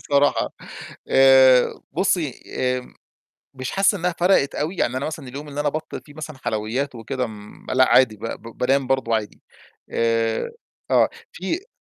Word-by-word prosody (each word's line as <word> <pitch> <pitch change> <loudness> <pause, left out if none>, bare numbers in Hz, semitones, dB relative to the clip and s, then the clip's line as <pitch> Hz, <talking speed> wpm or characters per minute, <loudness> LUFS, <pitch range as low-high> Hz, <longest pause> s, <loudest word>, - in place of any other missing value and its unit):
بصراحة 145 0 +2 0.6
آآ 130 -1 +6
بُصّي 165 -5 0
آمم 125 0 -2 0.6
مش 130 -1 -5
حاسس 195 +1 +3
إنّها 180 -2 -1
فرقِت 175 -6 +3
أوي، 165 +5 -2
يعني 125 +2 0
أنا 130 - -2
مثلًا 145 -4 -6
اليوم 145 +4 -8
اللي 145 +1 -4
أنا 145 - +1
أبطّل 155 +2 -5
فيه 145 - -16
مثلًا 155 -1 -7
حلويات 115 +6 -2
وكده 125 +3 -3
م 105 -1 -12
ما - - -3
لأ، 130 0 +4
عادي 110 -5 +5
ب - - -21
ب 115 0 -8
بانام 135 +1 +2
برضه 130 -3 +1
عادي، 105 -1 -6 0.5
آآ 115 - 0 0.4
آه - - +5 0.2
في 330 - -4
135 Hz, 165 wpm, -22 LUFS, 125-150 Hz, 0.6 s, آآ